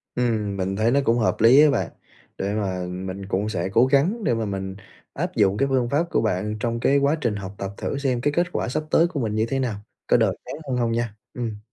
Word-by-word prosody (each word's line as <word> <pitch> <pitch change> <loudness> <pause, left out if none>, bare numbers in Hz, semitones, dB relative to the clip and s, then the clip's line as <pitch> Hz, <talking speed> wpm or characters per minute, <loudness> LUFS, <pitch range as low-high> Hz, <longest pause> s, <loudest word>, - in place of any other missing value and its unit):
Ừm, 110 -5 0
mình 95 +1 -1
thấy 110 +3 +2
nó 140 - +4
cũng 115 +1 +3
hợp 110 - +2
lý 125 +6 +8
á 155 - +6
bạn. 140 - 0 0.5
Để 100 +1 -2
mà 95 -4 -2
mình 95 +2 -5
cũng 100 +2 -1
sẽ 95 -3 -2
cố 120 +3 +5
gắng 160 - +2
để - - +2
mà 115 -1 -1
mình 95 -1 -4 0.4
áp - - -3
dụng 100 0 +3
cái 135 - +2
phương 130 -3 +1
pháp 150 +6 +1
của - - +1
bạn 105 0 -1
trong 115 +1 -1
cái 140 +4 +3
quá 140 +2 +3
trình 115 -4 0
học 100 0 -6
tập 100 0 -4
thử 140 - -3
xem 130 -4 0
cái 145 +2 +1
kết 175 +2 +1
quả - - -2
sắp 155 +4 -1
tới 165 +1 +5
của 165 -5 -4
mình 110 -4 -1
như 110 +1 +2
thế 135 - 0
nào, 125 -5 -1 0.3
có - - +5
đỡ - - +2
chán - - -6
hơn 125 - 0
hông 120 -2 +1
nha! 115 -2 -2 0.2
Ừm. 115 -4 -4
115 Hz, 260 wpm, -23 LUFS, 100-135 Hz, 0.5 s, lý